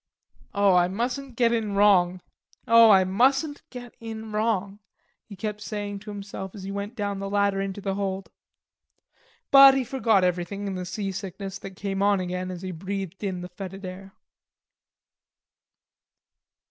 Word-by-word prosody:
"Oh, 200 -1 +4
I 175 -1 +4
mustn't 245 +6 -3
get 235 -1 +3
in 220 -3 -1
wrong. 185 -3 +4 0.5
Oh, 230 -1 +8
I 190 -2 +7
mustn't 270 - +1
get 245 -2 -9
in 220 -1 -7
wrong," 210 -2 -1 0.5
he 205 - -11
kept 210 +1 -5
saying 205 -2 -5
to 210 +2 -11
himself 200 -1 -7
as 195 - -9
he 195 - -5
went 200 +3 -5
down 200 -3 -3
the 195 0 -4
ladder 200 -1 +1
into 195 +1 -4
the 195 0 -2
hold. 195 -1 -3 1.2
But 275 -1 +9
he 270 - +1
forgot 225 -6 +2
everything 180 +3 -1
in 195 - -3
the 185 -1 -4
seasickness 195 0 -5
that 195 -1 -9
came 195 0 -3
on 200 -1 +3
again 180 0 -3
as 180 0 -7
he 185 - -4
breathed 190 +2 -5
in 185 -3 -3
the 180 - -7
fetid 195 +1 -8
air. 190 +1 -9
200 Hz, 160 wpm, -25 LUFS, 190-215 Hz, 1.2 s, But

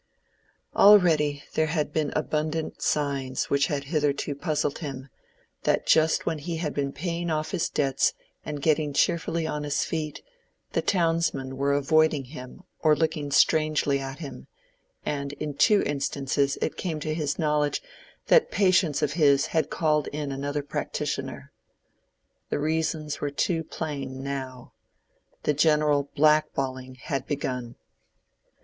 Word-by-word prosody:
Already 160 -8 +5
there 155 - +2
had 150 -2 -1
been 155 -2 0
abundant 155 +1 -2
signs 140 -3 -1
which 140 -1 +3
had 145 -2 -2
hitherto 145 -1 0
puzzled 150 -1 -1
him, 135 -4 -6 0.5
that - - +1
just 160 0 +3
when 160 - -1
he 165 +2 -4
had 155 -3 -2
been 140 -1 -1
paying 170 +2 -3
off 155 -1 -1
his 180 -4 0
debts 135 -2 +1 0.3
and 145 -2 -5
getting 155 -2 +2
cheerfully 165 +1 +1
on 150 -1 -2
his 145 -1 0
feet, 155 -2 -4 0.5
the - - 0
townsmen 165 -7 0
were 140 +1 +1
avoiding 150 +1 +3
him 130 +5 -10 0.2
or 155 -1 +4
looking 155 -1 -1
strangely 155 -1 +3
at 135 0 -6
him, 140 - -8 0.6
and 140 -1 -3
in 150 0 -4
two 205 +9 +4
instances 140 0 -1
it - - -2
came 165 -5 -3
to 155 +1 -2
his 150 -3 -2
knowledge 150 -2 +1 0.5
that 475 -1 +5
patients 185 - +2
of 150 - +1
his 140 -4 +4
had 160 -1 0
called 155 -2 +1
in 145 -1 -4
another 145 +2 -3
practitioner. 140 - -4 1.0
The - - 0
reasons 155 0 -1
were 145 - 0
too 160 +4 0
plain 140 -4 -5
now. 130 -2 -6 0.7
The 150 - +2
general 150 -1 +3
black 155 +1 +4
balling 130 -1 -3
had 135 +1 -4
begun. 125 -4 -3
150 Hz, 140 wpm, -26 LUFS, 140-160 Hz, 1.0 s, Already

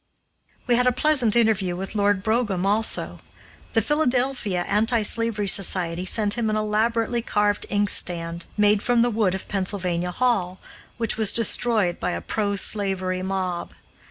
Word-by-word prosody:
We 240 -1 +2
had 250 0 +2
a - - +5
pleasant 255 -4 +2
interview 210 -6 +2
with 190 +3 -6
Lord 205 -2 +1
Brougham 220 -5 0
also. 210 +3 +1 0.5
The 225 - +2
Philadelphia 250 - 0
Anti 220 +2 +2
slavery 215 -1 -1
Society 180 -2 0
sent 210 +1 +1
him 225 -2 0
an 215 - 0
elaborately 225 +2 0
carved 205 -2 0
inkstand, 170 -4 -1
made 210 0 +3
from 240 0 +2
the 240 - +1
wood 210 -4 +1
of 190 - -8
Pennsylvania 185 -3 -2
Hall, 190 -4 -1 0.4
which 225 -2 -1
was 220 -3 +3
destroyed 220 -4 +1
by - - -2
a 85 - -3
pro 200 - -2
slavery 190 -2 0
mob. 185 -2 -3
210 Hz, 150 wpm, -23 LUFS, 185-230 Hz, 0.5 s, a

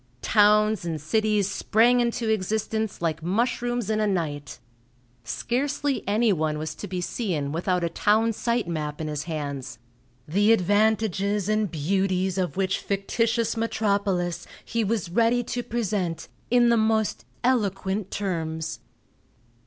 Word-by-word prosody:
Towns 210 -1 +4
and 165 -2 -3
cities 210 +5 +1
sprang 230 +5 +3
into 235 -1 0
existence 220 0 -1
like 165 -1 -1
mushrooms 235 +5 0
in 215 0 0
a 215 - +2
night. 150 -7 -2 0.7
Scarcely 270 - -1
anyone 200 -8 +2
was 155 0 -4
to 205 - -7
be 180 -1 -3
seen 170 - -2
without 180 +2 0
a 170 - +1
town 220 +6 +2
site 235 -1 -1
map 150 -3 -3
in 160 - -3
his 150 -1 -3
hands, 140 -6 -5 0.5
the 205 +8 +4
advantages 205 -1 +1
and 215 -1 +1
beauties 185 +3 0
of 185 0 -2
which 190 -1 +1
fictitious 225 +4 0
metropolis 200 -6 0 0.2
he 230 0 -1
was 205 -5 -1
ready 235 +4 +3
to 245 +1 -3
present 205 -8 -2 0.2
in 240 0 +5
the 235 - +4
most 220 -1 +1 0.2
eloquent 200 -5 0
terms. 160 -5 -3
200 Hz, 130 wpm, -25 LUFS, 170-225 Hz, 0.7 s, in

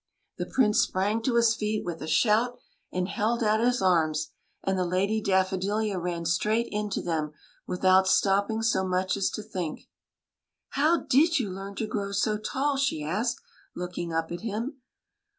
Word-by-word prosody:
The - - -2
Prince 210 -5 +3
sprang 205 +4 0
to 235 +1 0
his 230 -1 +5
feet 215 -1 -2
with 170 -2 -5
a 155 - -5
shout 235 +7 +2 0.3
and 180 0 -1
held 225 +4 0
out 215 0 +3
his 245 -2 +1
arms; 160 -4 +2 0.3
and 195 - 0
the 185 - +1
Lady 195 +5 0
Daffo 190 -1 +1
dilia 205 0 -1
ran 170 -1 -3
straight 210 +7 +1
into 210 -1 -2
them 155 -3 -2 0.3
without 185 +1 +3
stopping 200 +3 +2
so 210 -4 +2
much 185 0 0
as 195 - +1
to 215 - -5
think. 180 -7 -4 0.5
" - - -61
How 315 +3 +4
did 325 +6 +4
you 225 -8 -1
learn 195 +1 -7
to 220 - -2
grow 200 -2 -3
so 210 +1 +1
tall?'* 275 +6 -1
she 270 - 0
asked, 215 +10 -1 0.3
looking 175 -1 -4
up 165 0 -1
at 175 - -5
him. 230 +6 -4
200 Hz, 175 wpm, -27 LUFS, 185-225 Hz, 0.5 s, his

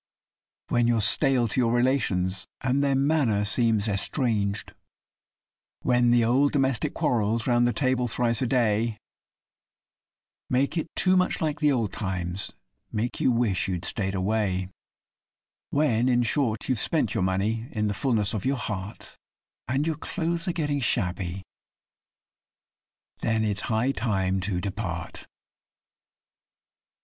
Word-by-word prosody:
When 120 0 +2
you're 120 -1 +2
stale 125 +4 +3
to 130 - -1
your 115 -2 +2
relations, 100 -8 0
and 135 +2 +1
their 140 -1 +2
manner 135 -7 +2
seems 110 -1 +1
estranged; 105 -1 -1 1.1
When 120 -1 +3
the 120 -1 +4
old 135 +5 +3
domestic 135 -5 +1
quarrels, 115 -1 0
round 120 -1 +3
the - - +2
table 130 0 0
thrice 115 0 +1
a 130 - +1
day, 115 -2 +1 1.5
Make 135 +5 +1
it 160 -1 -1
too 185 0 +4
much 180 0 +1
like 155 -2 -1
the 150 -1 +3
old 115 -7 -1
times 95 -1 -3 0.4
make 115 +3 -2
you - - +3
wish 115 -6 +1
you'd 90 -2 -3
stayed 95 -2 -2
away, 95 -1 0 1.0
When, 130 -5 +2
in 120 -1 +3
short, 115 -3 0
you've 130 -4 0
spent 120 -7 +1
your - - -1
money 100 +5 0
in 105 -1 -1
the 105 - 0
fulness 105 -2 0
of 105 - -3
your 135 +1 0
heart, 105 -4 -6 0.5
And 135 +4 0
your 160 -2 -1
clothes 170 +1 -3
are - - +2
getting 145 -4 -1
shabby.... 95 -6 -2 1.8
Then 110 0 0
it's 105 -2 +1
high 115 +4 +1
time 95 -6 0
to 90 -1 -2
depart. 95 -4 -5
115 Hz, 135 wpm, -26 LUFS, 100-130 Hz, 1.8 s, the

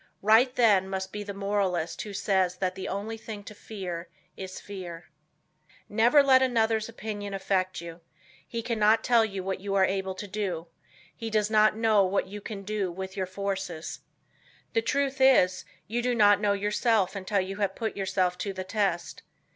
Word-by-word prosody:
Right, 225 +5 +5
then, 200 -5 +4
must 190 0 -3
be 210 - -5
the 205 0 -5
moralist 195 -4 -1
who 210 - -6
says 190 -2 +1
that 185 -1 -1
the 190 - -6
only 215 +3 -4
thing 215 -2 -8
to 210 - -10
fear 180 -5 -6 0.3
is 190 -1 -7
fear. 175 -5 -9 0.8
Never 235 +7 +5
let 260 -1 +6
another's 225 -3 +1
opinion 205 -3 -5
affect 185 -2 -1
you; 170 0 -9 0.5
he 230 -1 -4
cannot 220 -1 +3
tell 230 -2 +4 0.2
what 190 0 -3
you 195 +1 -3
are 190 -1 +5
able 190 0 -2
to 205 - -7
do; 185 -5 -3 0.5
he 225 -1 -5
does 215 -1 +1
not 215 0 +4
know 220 -3 +4
what 190 +1 0
you 205 +2 -8
can 200 -1 -7
do 200 -2 -2
with 190 +2 -6
your 190 -2 -2
forces. 190 -4 -4 0.7
The 225 - +3
truth 275 +2 -1
is 185 -9 +5 0.2
you 235 +3 -2
do 245 0 0
not 205 -2 +5
know 205 -1 +3
yourself 205 0 +1
until 200 +1 -1
you 190 +1 -3 0.2
put 225 -2 -3
yourself 185 -2 0
to 200 - -3
the 190 0 -5
test. 190 -3 -1
200 Hz, 175 wpm, -28 LUFS, 190-220 Hz, 0.8 s, let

